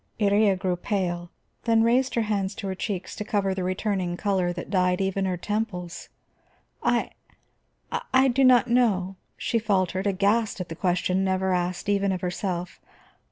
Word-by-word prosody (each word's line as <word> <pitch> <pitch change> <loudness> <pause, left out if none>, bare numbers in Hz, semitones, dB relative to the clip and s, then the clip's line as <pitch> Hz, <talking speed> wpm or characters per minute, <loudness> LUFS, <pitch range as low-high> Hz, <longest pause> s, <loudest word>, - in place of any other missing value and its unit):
Iría 205 -1 +3
grew 185 -1 -1
pale, 175 -2 -2 0.4
then 225 -1 +4
raised 250 +3 +2
her 230 - +2
hands 200 -2 -1
to - - -6
her 190 - -2
cheeks 190 -1 -4
to 210 - -3
cover 200 -2 0
the 190 -1 -3
returning 185 -1 -1
color 190 -3 0
that 175 +1 -7
dyed 180 -2 +2
even 195 0 0
her 185 -1 -1
temples. 180 -4 -4 0.7
"I - - +1 1.0
I 265 +1 +5
do 265 +2 +2
not 250 -3 +6
know," 205 -6 +2 0.2
she 230 - 0
faltered, 190 -3 0
aghast 205 +3 +1
at 180 -2 -6
a - - -4
question 180 +1 +1
never 190 0 +1
asked 180 +1 -2
even 200 -1 +2
of 185 -2 -2
herself. 180 -1 -3
195 Hz, 160 wpm, -25 LUFS, 180-210 Hz, 1.0 s, not